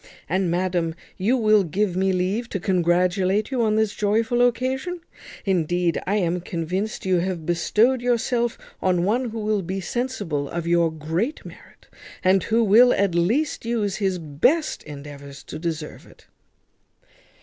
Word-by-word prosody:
And, 185 Hz, +2 st, 0 dB
madam, 175 Hz, -2 st, 0 dB, 0.2 s
you 225 Hz, +8 st, +2 dB
will 215 Hz, -3 st, +4 dB
give 185 Hz, +2 st, -1 dB
me 190 Hz, +1 st, +2 dB
leave 190 Hz, +6 st, -1 dB
to 195 Hz, -, -3 dB
congratulate 185 Hz, +4 st, +1 dB
you 255 Hz, -2 st, 0 dB
on 215 Hz, -2 st, +2 dB
this 220 Hz, -1 st, +1 dB
joyful 225 Hz, +4 st, +1 dB
occasion: 260 Hz, +8 st, 0 dB, 0.4 s
indeed, 175 Hz, -2 st, +1 dB
I 200 Hz, -, +1 dB
am 180 Hz, -3 st, 0 dB
convinced 185 Hz, +7 st, -3 dB
you 185 Hz, -1 st, +2 dB
have 175 Hz, -2 st, -3 dB
bestowed 215 Hz, +9 st, +2 dB
yourself 240 Hz, -1 st, 0 dB, 0.2 s
on 180 Hz, -2 st, +2 dB
one 235 Hz, +7 st, +1 dB
who 225 Hz, -, -7 dB
will 215 Hz, -1 st, 0 dB
be 190 Hz, +2 st, -4 dB
sensible 190 Hz, -, -3 dB
of 170 Hz, -1 st, -4 dB
your 170 Hz, -1 st, +2 dB
great 165 Hz, -, -3 dB
merit, -, -, -14 dB, 0.4 s
and 190 Hz, +1 st, +4 dB
who 230 Hz, +2 st, +2 dB
will 230 Hz, +4 st, +6 dB
at 195 Hz, -3 st, +1 dB
least 225 Hz, -, +1 dB
use 220 Hz, -4 st, -1 dB
his 190 Hz, -3 st, 0 dB
best 170 Hz, -, 0 dB
endeavours 140 Hz, -1 st, -10 dB
to -, -, -8 dB
deserve 160 Hz, -2 st, -5 dB
it." -, -, -19 dB
190 Hz, 150 wpm, -23 LUFS, 170-225 Hz, 0.4 s, will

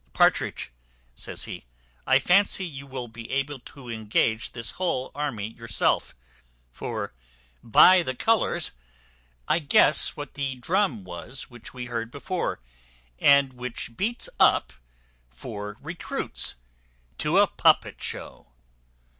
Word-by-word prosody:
"Partridge," -, -, +2 dB, 0.4 s
says -, -, -4 dB
he, -, -, -7 dB, 0.4 s
"I 130 Hz, -, +6 dB
fancy 190 Hz, +6 st, +3 dB
you 140 Hz, -4 st, -8 dB
will 130 Hz, -2 st, -5 dB
be 115 Hz, 0 st, -10 dB
able 140 Hz, +1 st, -2 dB
to 130 Hz, +1 st, -13 dB
engage 110 Hz, 0 st, 0 dB
this 115 Hz, -2 st, 0 dB
whole 170 Hz, -8 st, -2 dB
army 130 Hz, -8 st, -3 dB
yourself; 115 Hz, -3 st, 0 dB, 0.6 s
for -, -, -5 dB, 0.5 s
by 180 Hz, +10 st, +7 dB
the 130 Hz, -6 st, -3 dB
colours 200 Hz, -, +1 dB, 0.8 s
I 165 Hz, -, +3 dB
guess 150 Hz, -1 st, +4 dB
what 145 Hz, 0 st, -7 dB
the 140 Hz, -2 st, -3 dB
drum 145 Hz, -, 0 dB
was 90 Hz, +10 st, -7 dB
which 120 Hz, 0 st, -10 dB
we 125 Hz, -1 st, -5 dB
heard 115 Hz, -2 st, -4 dB
before, 145 Hz, -, -3 dB, 0.6 s
and 140 Hz, -2 st, +5 dB
which 125 Hz, -1 st, -6 dB
beats 230 Hz, -, -1 dB
up -, -, +4 dB, 0.6 s
for 105 Hz, -, -7 dB
recruits 165 Hz, +5 st, -2 dB, 0.6 s
to -, -, +2 dB
a -, -, +7 dB
puppet -, -, +2 dB
show." -, -, -6 dB
130 Hz, 120 wpm, -26 LUFS, 115-150 Hz, 0.8 s, by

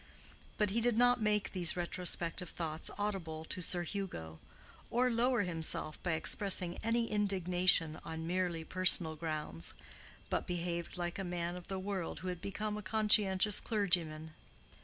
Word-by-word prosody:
But 210 Hz, -2 st, +1 dB
he 230 Hz, +3 st, +1 dB
did 240 Hz, -1 st, +1 dB
not 245 Hz, 0 st, +4 dB
make 210 Hz, -1 st, +1 dB
these 180 Hz, -2 st, +1 dB
retrospective 175 Hz, 0 st, -1 dB
thoughts 160 Hz, -1 st, -3 dB
audible 175 Hz, -7 st, -3 dB
to 180 Hz, -, -4 dB
Sir 175 Hz, 0 st, +1 dB
Hugo, 155 Hz, -, -5 dB, 0.5 s
or 250 Hz, +1 st, +2 dB
lower 240 Hz, -1 st, +2 dB
himself 160 Hz, -3 st, 0 dB
by 175 Hz, -, -1 dB
expressing 180 Hz, +2 st, +3 dB
any 230 Hz, +1 st, 0 dB
indignation 180 Hz, -5 st, +2 dB
on 160 Hz, 0 st, -6 dB
merely 175 Hz, -1 st, -1 dB
personal 175 Hz, -2 st, +3 dB
grounds, 150 Hz, -, -4 dB, 0.5 s
but -, -, -2 dB
behaved 170 Hz, 0 st, -3 dB
like 175 Hz, +1 st, -3 dB
a -, -, -2 dB
man 175 Hz, -1 st, -3 dB
of 180 Hz, -1 st, -10 dB
the 190 Hz, -, -3 dB
world 190 Hz, -3 st, -4 dB
who 185 Hz, -, -4 dB
had 180 Hz, -2 st, -5 dB
become 210 Hz, +2 st, -3 dB
a -, -, -5 dB
conscientious 210 Hz, -1 st, +4 dB
clergyman. 170 Hz, -7 st, 0 dB
180 Hz, 150 wpm, -34 LUFS, 165-205 Hz, 0.5 s, not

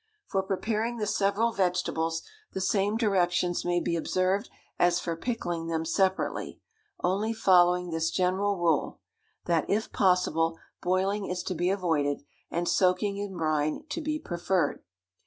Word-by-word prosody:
For 195 Hz, -, 0 dB
preparing 215 Hz, +5 st, -1 dB
the 215 Hz, -, -1 dB
several 205 Hz, +3 st, +1 dB
vegetables, 175 Hz, -4 st, 0 dB, 0.3 s
the -, -, -2 dB
same 200 Hz, +2 st, +1 dB
directions 180 Hz, -5 st, +1 dB
may 175 Hz, 0 st, +1 dB
be 170 Hz, -, -1 dB
observed 185 Hz, +6 st, 0 dB, 0.3 s
as 175 Hz, 0 st, +4 dB
for 170 Hz, -2 st, -3 dB
pickling 175 Hz, -5 st, -3 dB
them 165 Hz, -1 st, -1 dB
separately, 190 Hz, +3 st, 0 dB, 0.4 s
only 205 Hz, +5 st, +1 dB
following 180 Hz, -4 st, +4 dB
this 165 Hz, 0 st, 0 dB
general 190 Hz, +3 st, +1 dB
rule 165 Hz, -4 st, +1 dB, 0.5 s
that, 165 Hz, -2 st, +1 dB
if 215 Hz, +2 st, 0 dB
possible, 165 Hz, -3 st, +2 dB, 0.2 s
boiling 195 Hz, +3 st, 0 dB
is 180 Hz, 0 st, -3 dB
to 185 Hz, -, -2 dB
be 175 Hz, +1 st, 0 dB
avoided, 160 Hz, -8 st, 0 dB, 0.3 s
and 175 Hz, +1 st, -2 dB
soaking 190 Hz, +2 st, +2 dB
in 200 Hz, -2 st, -5 dB
brine 155 Hz, -2 st, 0 dB
to 330 Hz, +3 st, -3 dB
be 305 Hz, 0 st, -1 dB
preferred. 175 Hz, -, -1 dB
180 Hz, 140 wpm, -28 LUFS, 170-200 Hz, 0.5 s, as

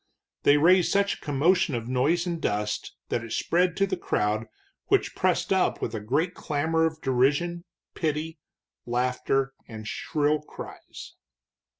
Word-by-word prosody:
They 145 Hz, -, +5 dB
raised 175 Hz, +4 st, +5 dB
such 200 Hz, 0 st, +2 dB
a -, -, -10 dB
commotion 160 Hz, +3 st, +2 dB
of 115 Hz, -1 st, -4 dB
noise 140 Hz, +8 st, +1 dB
and 170 Hz, -2 st, -3 dB
dust 105 Hz, 0 st, -2 dB
that 115 Hz, -, -1 dB
it 115 Hz, -1 st, -6 dB
spread 180 Hz, +1 st, +1 dB
to 195 Hz, -, +3 dB
the 190 Hz, -1 st, -2 dB
crowd, 110 Hz, -, -1 dB, 0.4 s
which -, -, +2 dB
pressed -, -, +1 dB
up -, -, +1 dB
with -, -, -3 dB
a 110 Hz, -, -2 dB
great 145 Hz, -, 0 dB
clamor 160 Hz, +1 st, 0 dB
of 160 Hz, -1 st, -7 dB
derision, 145 Hz, +7 st, +1 dB, 0.3 s
pity, 155 Hz, -1 st, -2 dB, 0.5 s
laughter, 125 Hz, +2 st, 0 dB
and 110 Hz, -2 st, -8 dB
shrill 150 Hz, +4 st, 0 dB
cries. 150 Hz, -, -10 dB
150 Hz, 150 wpm, -26 LUFS, 125-170 Hz, 0.5 s, They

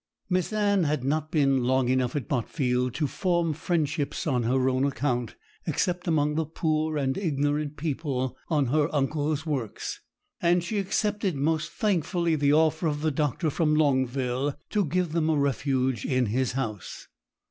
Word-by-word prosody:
Miss 180 Hz, +1 st, +1 dB
Anne 205 Hz, -4 st, +2 dB
had 150 Hz, -3 st, 0 dB
not 155 Hz, +3 st, 0 dB
been 135 Hz, -5 st, +2 dB
long 130 Hz, 0 st, +2 dB
enough 130 Hz, 0 st, +1 dB
at 140 Hz, -6 st, -2 dB
Botfield 125 Hz, -1 st, 0 dB
to 155 Hz, -, 0 dB
form 170 Hz, +1 st, 0 dB
friendships 150 Hz, -2 st, -1 dB
on 130 Hz, -6 st, +1 dB
her 130 Hz, +3 st, +1 dB
own 130 Hz, 0 st, +1 dB
account, 125 Hz, -3 st, -1 dB, 0.3 s
except 180 Hz, 0 st, -1 dB
among 150 Hz, -2 st, +2 dB
the 160 Hz, +1 st, 0 dB
poor 155 Hz, -1 st, 0 dB
and 135 Hz, -2 st, 0 dB
ignorant 145 Hz, -3 st, -1 dB
people 135 Hz, -4 st, -2 dB
on 150 Hz, -4 st, +2 dB
her 155 Hz, 0 st, +3 dB
uncle's 150 Hz, +2 st, 0 dB
works; 135 Hz, -9 st, -3 dB, 0.4 s
and 175 Hz, 0 st, +3 dB
she 205 Hz, +4 st, -2 dB
accepted 200 Hz, -1 st, 0 dB
most 155 Hz, +3 st, 0 dB
thankfully 175 Hz, -4 st, 0 dB
the 145 Hz, -1 st, +2 dB
offer 160 Hz, +2 st, +3 dB
of 145 Hz, -1 st, -1 dB
the 155 Hz, 0 st, +1 dB
doctor 150 Hz, +2 st, 0 dB
from 150 Hz, 0 st, +2 dB
Longville 130 Hz, -2 st, +1 dB, 0.2 s
to 205 Hz, -2 st, +2 dB
give 175 Hz, +1 st, 0 dB
them 160 Hz, -1 st, +1 dB
a 155 Hz, -, +2 dB
refuge 130 Hz, -3 st, 0 dB
in 130 Hz, -1 st, +1 dB
his 125 Hz, +4 st, 0 dB
house. 110 Hz, -7 st, -5 dB
150 Hz, 160 wpm, -27 LUFS, 130-160 Hz, 0.4 s, her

